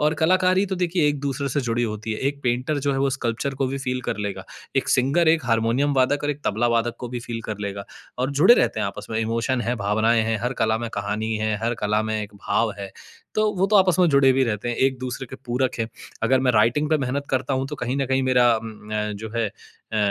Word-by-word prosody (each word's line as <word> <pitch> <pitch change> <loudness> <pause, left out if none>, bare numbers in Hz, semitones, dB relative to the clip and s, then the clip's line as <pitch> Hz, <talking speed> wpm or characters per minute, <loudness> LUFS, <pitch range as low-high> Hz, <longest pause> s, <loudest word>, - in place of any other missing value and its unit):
और 150 +1 +2
कलाकारी 185 +3 +3
तो 190 -1 -3
देखिए, 175 -3 +1
एक-दूसरे 140 -1 -2
से 140 +2 0
जुड़ी 120 -1 -1
होती 110 -1 -3
है। 110 - -4
एक 140 0 -6
पेंटर 125 +4 0
जो 140 0 0
है, 135 - -1
वो 135 0 +2
स्कल्पचर 125 +1 -2
को 135 0 0
भी 135 +1 -3
फ़ील 130 -1 -2
कर - - -1
लेगा, 100 - -5 0.3
एक - - +1
सिंगर, 140 +6 +3
एक 160 -3 +3
हारमोनियम 115 +5 +1
वादक 135 +2 +2
और 145 - +1
एक 145 0 -5
तबला 110 +4 +1
वादक 115 +1 -1
को 125 - -6
भी 120 0 -5
फ़ील 115 -1 -5
कर 105 -2 -4
लेगा 100 -1 -4 0.3
और 130 +2 0
जुड़े 155 +12 +6
रहते - - +1
हैं - - 0
आपस 100 - -7
में, 110 - -1
इमोशन 115 +3 0
हैं, 120 +1 -1
भावनाएँ 110 +3 +2
हैं, 110 -1 0
हर 125 +1 0
कला 110 0 +2
में 115 0 -4
कहानी 105 +2 -2
है, 110 0 0
हर 115 +1 0
कला 105 +1 +2
में 110 0 -2
एक 105 0 -9
भाव 100 +2 0
है, 100 -1 -6 0.4
तो 215 0 +2
वो 190 +2 +2
तो 210 +1 +3
आपस 185 -3 +4
में 180 - +5
जुड़े 140 -3 +5
भी 135 +1 +2
रहते 115 0 -2
हैं, 120 - -2
एक-दूसरे 130 -1 -1
के 130 - -9
पूरक 125 +1 0
हैं। 115 -1 -1 0.3
अगर 130 +3 +3
मैं 130 -1 +3
राइटिंग 120 +7 +3
पे 155 - +4
मेहनत 140 +2 -2
करता 130 +1 0
हूँ, 130 +1 -1
तो 150 - -5
कहीं 125 +1 -2
न 135 -1 0
कहीं 135 +1 +1
मेरा 130 -1 +3
उम 110 0 -6 0.2
अ, 105 0 -1
जो 110 +2 -6
है 115 - +1
अ 110 - -11
125 Hz, 255 wpm, -23 LUFS, 110-140 Hz, 0.4 s, जुड़े